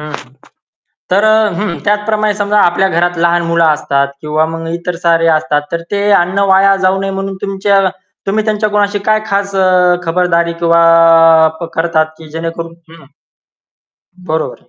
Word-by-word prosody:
हं. 150 -4 -9 0.8
तर 200 +3 +2
अ - - +4 0.3
हं, 200 -6 -3
त्याचप्रमाणे 210 0 0
समजा 205 0 -1
आपल्या 185 +2 +2
घरात 175 0 -1
लहान 170 0 +1
मुलं 170 0 +2
असतात 140 -3 0
किंवा 155 +1 -1
मग 165 0 -6
इतर 170 0 -4
सारे 165 -1 +2
असतात. 150 -1 -1
तर 170 - -2
ते 200 0 -1 0.2
अन्न 180 +3 -1
वाया 195 +1 +4
जाऊ 190 +1 +1
नये 195 0 -3
म्हणून 195 0 -5
तुमच्या 195 0 0 0.5
तुम्ही 210 +2 -1
त्यांच्या 215 0 -1
कुणाशी 205 0 0
काय 215 0 +2
खास 200 0 -2
अ, 180 -1 +3
खबरदारी 170 0 0
किंवा 170 0 +3 0.8
प - - -4
करतात, 165 -1 +1
की 160 -1 -13
जेणेकरून 165 +1 -6 0.2
हं. 165 -2 -15 1.2
बरोबर 160 0 -3
आहे. - - -31
175 Hz, 160 wpm, -13 LUFS, 165-200 Hz, 1.2 s, अ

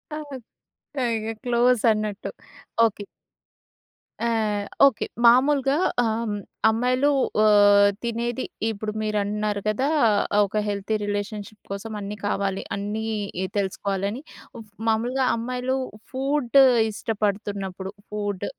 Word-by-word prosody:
ఆ! - - -4 1.0
ఇగ 220 +1 -3
క్లోజ్ 245 -1 +3
అన్నట్టు 215 -1 -3 0.6
ఓకే. 205 -1 -4 1.2
ఆహ్, 215 -3 0 0.2
ఓకే. 275 -5 +2 0.2
మామూలుగా 270 +3 +5 0.3
ఆహ్, 225 - +1 0.2
హ్మ్ 205 - -2 0.3
అమ్మాయిలు 250 +5 +2 0.4
ఆహ్, 205 -1 +6
తినేది 235 +2 -2 0.2
ఇప్పుడు 215 0 -4
మీరు 215 -1 -1
అంటున్నారు 210 0 -2
కదా! 215 +6 +1 0.5
ఆహ్, 210 - +5
ఒక 205 - -4
హెల్తీ 205 +1 -2
రిలేషన్‌షిప్ 205 +1 -4
కోసం 200 +3 -5
అన్నీ 205 +1 -5
కావాలి 195 -1 -1
అన్నీ 205 +2 -3 0.5
తెలుసుకోవాలని 200 +3 -2 0.4
ఫు 230 - -8 0.3
మామూలుగా 245 +4 +1
అమ్మాయిలు 250 +2 -2 0.4
ఫుడ్ 275 0 +2 0.3
ఇష్టపడుతున్నప్పుడు, 200 -3 -3 0.2
ఫుడ్ 205 -2 -3
215 Hz, 105 wpm, -24 LUFS, 205-240 Hz, 1.2 s, ఆహ్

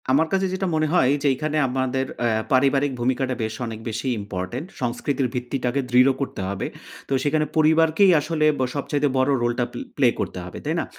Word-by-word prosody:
আমার 145 +5 +3
কাছে 195 0 +2
যেটা 190 0 -1
মনে 155 0 +1
হয় 130 -8 +4
যে, 150 - +1
এইখানে 155 +3 -2
আমাদের 130 +1 -1 0.2
অ্যা 120 - +2 0.2
পারিবারিক 135 +2 +3
ভূমিকাটা 130 +1 0
বেশ 110 0 -3
অনেক 110 -1 -6
বেশি 115 +4 -4
ইম্পোর্টেন্ট, 105 - -5
সংস্কৃতির 130 +2 -1
ভিত্তিটাকে 125 +1 -1
দৃঢ় 125 +2 +6
করতে 135 - -3
হবে। 100 -1 -3 0.4
তো - - -2
সেখানে 150 +1 +1
পরিবারকেই 160 +4 +5
আসলে 155 0 0
ব - - 0
সবচাইতে 145 +1 0
বড় 130 +1 +2
রোলটা 120 0 0
পে - - -7 0.2
প্লে 135 -3 +5
করতে - - -3
হবে, 90 - -8
তাই 155 +3 0
না? - - -4
135 Hz, 185 wpm, -23 LUFS, 125-155 Hz, 0.4 s, দৃঢ়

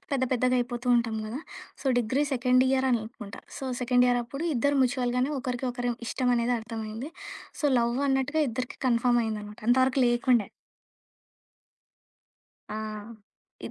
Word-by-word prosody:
పెద్ద 270 - +1
పెద్దగాయిపోతుంటాం 245 -2 +1
కదా! 225 +5 -5 0.4
So, - - -7
degree 245 +4 +1
second 255 0 +3
year 265 0 +2
అని 240 - +3
అనుకుంట. 220 -3 -9 0.2
సో, - - -6 0.2
సెకండ్ 250 0 +3
ఇయర్ 245 0 +3
అప్పుడు 275 +7 -6
ఇద్దరు 285 +4 +2
మ్యూచువల్‌గానే 250 +1 +1
ఒకరికి 250 0 -3
ఒకరి 245 0 -2 0.2
ఇష్టం 250 +1 0
అనేది 235 +1 +1
అర్థమైంది. 225 +4 -6 0.5
సో, - - -4
లవ్ 235 +1 +1
అన్నట్టుగా 270 +3 +1
ఇద్దరికి 250 +2 -5
కన్‌ఫర్మ్ 240 0 +3
అయిందనమాట. 210 -1 -5
అంతవరకు 260 +2 +4
లేకుండే. 240 -2 +3 2.3
ఆ! - - -4 0.9
ఇద్ - - -7
245 Hz, 130 wpm, -27 LUFS, 235-260 Hz, 2.3 s, అంతవరకు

